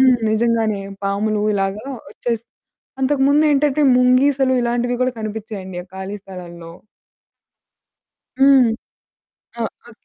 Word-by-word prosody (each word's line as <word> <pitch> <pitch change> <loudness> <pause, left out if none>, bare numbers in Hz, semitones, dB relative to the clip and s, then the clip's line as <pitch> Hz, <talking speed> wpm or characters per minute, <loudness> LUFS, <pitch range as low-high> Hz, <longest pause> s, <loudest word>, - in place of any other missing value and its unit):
హ్మ్. 260 -1 +6
నిజంగానే 220 -2 +1 0.2
పాములు 210 +2 0
ఇలాగా 195 +4 -2 0.2
వచ్చేస్ 235 -2 -3 0.6
అంతకుముందేంటంటే 285 +1 +3 0.2
ముంగీసలు 260 +1 +3
ఇలాంటివి 240 +1 0
కూడా 255 0 +1
కనిపించేయండి 210 -4 -6
ఆ - - -25
ఖాళీ 190 +2 -5
స్థలాల్లో. 175 -3 -10 1.7
హ్మ్. 270 -3 +6 0.9
ఆ! - - -1 0.3
ఉ - - -13
230 Hz, 95 wpm, -19 LUFS, 200-265 Hz, 1.7 s, హ్మ్